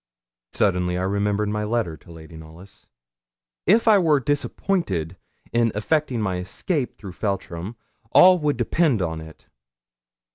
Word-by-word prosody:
Suddenly 90 -3 +1
I 90 - -2
remembered 100 +2 0
my 105 0 -2
letter 105 -6 -1
to 80 - -17
Lady 80 0 -12
Knollys. 80 +4 -14 0.8
If 225 +5 +4
I 210 -2 +7
were 155 -5 +3
disappointed 135 - -1 0.4
in 115 -1 +2
effecting 130 +3 0
my 95 -4 -1
escape 125 - -3
through 100 -4 -9
Feltram, 95 +1 -4 0.4
all 185 0 +7
would 150 -4 0
depend 130 +1 +1
upon 80 -2 -3
it. 80 0 -14
105 Hz, 135 wpm, -23 LUFS, 90-145 Hz, 0.8 s, I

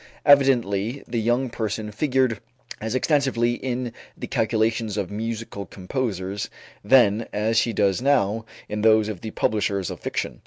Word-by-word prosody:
Evidently 130 -5 +3
the 115 -1 -1
"young 120 +4 +1
person" 110 -1 -3
figured 130 -1 +1 0.4
as 110 +3 -3
extensively 130 -4 +2
in 125 -1 -3 0.2
the - - -5
calculations 110 -1 0
of 100 -3 -2
musical 110 -2 -4
composers 95 -1 -3 0.3
then 110 -1 +4
as 110 +2 0
she 115 +1 +3
does 100 -1 +1
now 115 -6 +2 0.2
in 105 0 -3
those 110 -1 +5
of 105 -5 -5
the 110 - -5
publishers 100 -3 0
of - - -7
fiction. - - -4
110 Hz, 145 wpm, -24 LUFS, 105-125 Hz, 0.4 s, those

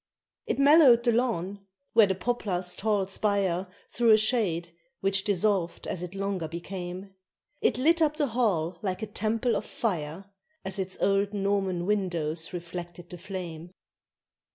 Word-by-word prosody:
It - - -1
mellowed 280 -4 +7
the 240 - +3
lawn, 205 -5 -1 0.3
where 220 -3 +6
the 190 - 0
poplar's 185 -4 -1
tall 205 -2 0
spire 195 -2 0 0.2
Threw 235 -1 +2
a 215 - +8
shade, 210 -7 +1 0.3
which 195 0 +1
dissolved 200 -4 0
as 175 - -3
it 180 +1 -6
longer 195 -4 -2
became. 180 +3 -7 0.5
It - - +2
lit 330 +6 +3
up 305 -1 +2
the 300 - +2
hall 190 - 0
like 190 +1 -3
a - - 0
temple 220 +3 -1
of - - -1
fire 175 -4 -3 0.4
As 190 +1 -3
its 190 0 -2
old 200 +1 +2
Norman 195 -3 0
windows 170 -6 -1
reflected 175 0 -7
the 180 - -8
flame. 175 -3 -7
195 Hz, 150 wpm, -27 LUFS, 175-215 Hz, 0.5 s, a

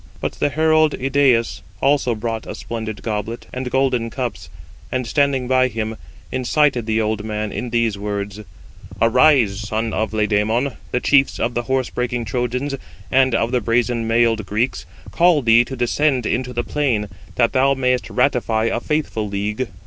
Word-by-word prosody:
But - - -2
the - - +2
herald 155 +1 +3
Idæus 130 -7 +2 0.2
also 135 -4 +2
brought 115 0 -4
a - - -5
splendid 110 -3 -6
goblet, 110 +1 -4
and 125 0 -3
golden 130 -3 +1
cups; 115 - -5 0.4
and 130 -1 -1
standing 135 0 +1
by 130 0 +3
him, 110 -2 -4 0.4
incited 130 -2 +1
the 110 0 +1
old 110 -1 -1
man 105 -1 -3
in 125 - -4
these 115 -3 0
words: 100 0 -4 0.6
"Arise, 115 -3 +4
son 110 +2 -2
of 110 -1 -1
Laomedon; 110 +4 0
the 125 - 0
chiefs 140 -1 +3
of 120 +2 0
the 120 - 0
horse 130 -1 0
breaking 125 -1 -2
Trojans, 125 +6 -2 0.4
and 130 -2 +4
of 115 +1 0
the 125 -1 +1
brazen 115 0 0
mailed 115 -1 +2
Greeks, 110 +6 -1 0.2
call 170 -4 +3
thee 115 +1 +6
to 130 - -6
descend 130 +1 +1
into 125 +3 -1
the 120 -1 -2
plain, 120 -7 0 0.3
that 115 -2 +2
thou 135 +1 +3
mayest 125 -1 0
ratify 125 -4 +1
a - - 0
faithful 135 -6 -2
league. 105 +5 -2
120 Hz, 165 wpm, -20 LUFS, 110-130 Hz, 0.6 s, thee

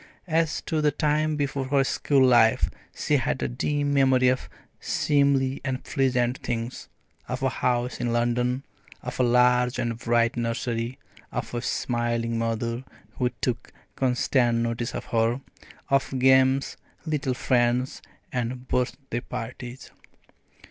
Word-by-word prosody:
As 165 -2 +1
to 160 -2 -1
the 150 - +4
time 150 +1 +1
before 140 -2 -1
her 135 +1 +2
school 135 0 +2
life, 120 -3 +4 0.2
she - - +1
had - - -1
a - - +1
dim 145 - -1
memory 130 -2 +4
of 130 0 -1 0.3
seemly 140 -2 +1
and 130 -1 -3
pleasant 125 -2 +1
things, 115 0 -4 0.4
of 125 +1 -4
a 135 - +3
house 125 0 -1
in 120 - 0
London, 120 +2 0 0.4
of 125 0 -6
a - - +4
large 125 0 +3
and 115 -1 -2
bright 120 0 +2
nursery, 115 +1 -2 0.3
of - - -4
a 120 - -2
smiling 115 -1 -1
mother 115 +2 -2 0.4
who 125 -1 +2
took 125 -2 -2 0.2
constant 125 -2 +2
notice 115 0 -2
of - - -4
her, 115 +2 +1 0.5
of 135 -1 +1
games, 130 +1 +4 0.3
little 145 -5 -1
friends, 125 0 +1 0.3
and 125 +1 -3
birthday 125 0 -2
parties. 125 +1 -7
125 Hz, 135 wpm, -26 LUFS, 120-135 Hz, 0.5 s, the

